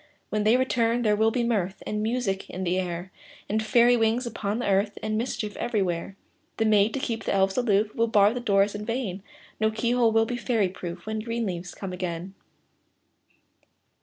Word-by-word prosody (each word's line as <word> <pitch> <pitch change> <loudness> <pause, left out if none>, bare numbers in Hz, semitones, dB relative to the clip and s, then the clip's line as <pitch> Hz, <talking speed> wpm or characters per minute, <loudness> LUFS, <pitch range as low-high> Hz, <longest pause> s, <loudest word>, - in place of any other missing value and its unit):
When 210 0 0
they 225 +3 +5
return, 240 -2 +1
there 210 -2 +3
will 220 +1 +3
be 240 +2 0
mirth 200 -5 -1
And 210 0 -2
music 220 -4 -1
in 185 - -5
the 180 +1 +1
air, 180 0 -4 0.4
And 215 +2 0
fairy 240 +2 +4
wings 230 +2 +1
upon 215 -3 -3
the 245 - -2
earth, 200 +1 +1
And 215 0 -1
mischief 215 -2 -3
everywhere. 195 -6 -1 0.4
The 225 - +1
maids, 210 0 +4
to 275 - -1
keep 230 -5 -3
the - - 0
elves 190 0 +2
aloof, 215 -3 +2
Will 230 0 +1
bar 210 -1 +4
the 245 - -3
doors 200 -3 +2
in 205 0 -5
vain; 215 -4 -3 0.4
No 220 0 +3
key 220 +2 -1
hole 240 -2 +3
will 225 0 +3
be 240 +2 -3
fairy 230 -6 +1
proof, 175 -1 -7
When 220 0 -3
green 230 +1 -2
leaves 180 -2 -5
come 190 -2 -6
again. 180 0 -4
215 Hz, 195 wpm, -26 LUFS, 195-230 Hz, 0.4 s, they